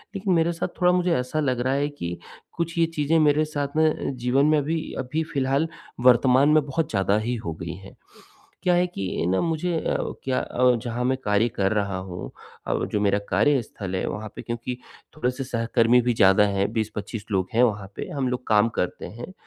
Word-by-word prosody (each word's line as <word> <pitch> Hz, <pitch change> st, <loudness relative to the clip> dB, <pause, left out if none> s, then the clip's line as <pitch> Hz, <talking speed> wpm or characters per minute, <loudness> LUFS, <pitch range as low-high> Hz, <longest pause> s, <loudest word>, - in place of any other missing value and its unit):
लेकिन 195 Hz, -1 st, 0 dB
मेरे 165 Hz, 0 st, +3 dB
साथ 165 Hz, -, -2 dB
थोड़ा 180 Hz, 0 st, +5 dB
मुझे 180 Hz, -1 st, +2 dB
ऐसा 125 Hz, +5 st, -2 dB
लग 130 Hz, -5 st, 0 dB
रहा 130 Hz, +2 st, +1 dB
है 140 Hz, +1 st, +1 dB
कि 85 Hz, -12 st, -5 dB, 0.4 s
कुछ 170 Hz, 0 st, -2 dB
ये 165 Hz, -, +4 dB
चीज़ें 150 Hz, +2 st, +2 dB
मेरे 150 Hz, 0 st, +3 dB
साथ 145 Hz, -2 st, -4 dB
में 155 Hz, -3 st, +1 dB
जीवन 125 Hz, +4 st, +2 dB
में 155 Hz, 0 st, +4 dB
अभी 155 Hz, +3 st, 0 dB, 0.2 s
अभी 150 Hz, +6 st, -2 dB
फिलहाल 140 Hz, +3 st, +1 dB, 0.4 s
वर्तमान 130 Hz, +3 st, +5 dB
में 155 Hz, -1 st, +4 dB
बहुत 150 Hz, +3 st, -2 dB
ज़्यादा 100 Hz, 0 st, +1 dB
ही 120 Hz, +3 st, -2 dB
हो 80 Hz, -, -2 dB
गई 85 Hz, +2 st, -6 dB
हैं। 95 Hz, +1 st, -13 dB, 0.7 s
क्या 180 Hz, -, +3 dB
है 180 Hz, +1 st, +3 dB
कि 95 Hz, -, -3 dB
ना, 95 Hz, +1 st, +2 dB
मुझे 165 Hz, +1 st, -1 dB
अ, -, -, -1 dB, 0.3 s
क्या 130 Hz, -1 st, 0 dB
अ, 125 Hz, 0 st, +2 dB
जहाँ 120 Hz, +1 st, -2 dB
मैं 130 Hz, +1 st, +2 dB
कार्य 105 Hz, +3 st, +2 dB
कर 95 Hz, 0 st, +1 dB
रहा 100 Hz, -3 st, -1 dB
हूँ 95 Hz, -1 st, -7 dB, 0.4 s
और -, -, -1 dB
जो 105 Hz, -, +1 dB
मेरा 100 Hz, 0 st, +2 dB
कार्यस्थल 115 Hz, -9 st, 0 dB
है, -, -, -1 dB
वहाँ 110 Hz, +1 st, -4 dB
पे -, -, -6 dB
क्योंकि 120 Hz, +1 st, -4 dB, 0.4 s
थोड़े-से 125 Hz, -2 st, -2 dB
सहकर्मी 115 Hz, 0 st, +2 dB
भी 120 Hz, 0 st, +1 dB
ज़्यादा 95 Hz, -1 st, +5 dB
हैं, 100 Hz, +1 st, 0 dB
20-25 110 Hz, -1 st, -4 dB
लोग 95 Hz, -2 st, 0 dB
हैं 120 Hz, -, +4 dB
वहाँ 105 Hz, -5 st, +1 dB
पे -, -, -5 dB
हम 135 Hz, -3 st, 0 dB
लोग 125 Hz, 0 st, -4 dB
काम 110 Hz, +1 st, +4 dB
करते 90 Hz, -, -2 dB
हैं। 120 Hz, -, -9 dB
125 Hz, 205 wpm, -24 LUFS, 105-150 Hz, 0.7 s, थोड़ा